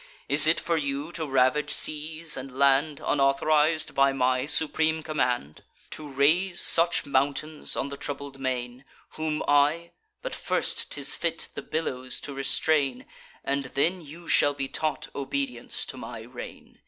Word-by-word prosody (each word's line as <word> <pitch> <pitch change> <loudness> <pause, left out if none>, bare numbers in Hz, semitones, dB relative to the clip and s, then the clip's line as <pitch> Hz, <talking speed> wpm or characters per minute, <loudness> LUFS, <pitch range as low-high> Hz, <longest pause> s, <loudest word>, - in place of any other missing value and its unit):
Is - - +5
it - - +3
for 170 -1 0
you 140 +1 -3
to 160 -3 -4
ravage 135 +2 +2
seas 155 +2 -1
and 135 -1 -8
land, 140 +2 +3
Unauthoriz'd 150 +3 +2
by 135 0 +4
my 130 0 +1
supreme 160 +1 +1
command? 125 - -2 0.3
To 150 -1 -7
raise 170 +7 +3
such 170 +1 +4
mountains 145 +3 -1
on 140 - -2
the 140 - -7
troubled 140 -1 -6
main? 125 -1 -3 0.3
Whom 155 -1 -2
I—but 170 - 0
first - - 0
'tis - - +1
fit - - -2
the - - -5
billows 130 -5 -3
to 140 - -5
restrain; 145 - +1 0.4
And 140 0 -1
then 165 +8 0
you 165 +3 -11
shall 145 0 +4
be 135 -1 -3
taught 155 +3 -3
obedience 270 - -3
to - - -7
my - - -7
reign. - - -11
145 Hz, 145 wpm, -27 LUFS, 135-160 Hz, 0.4 s, Is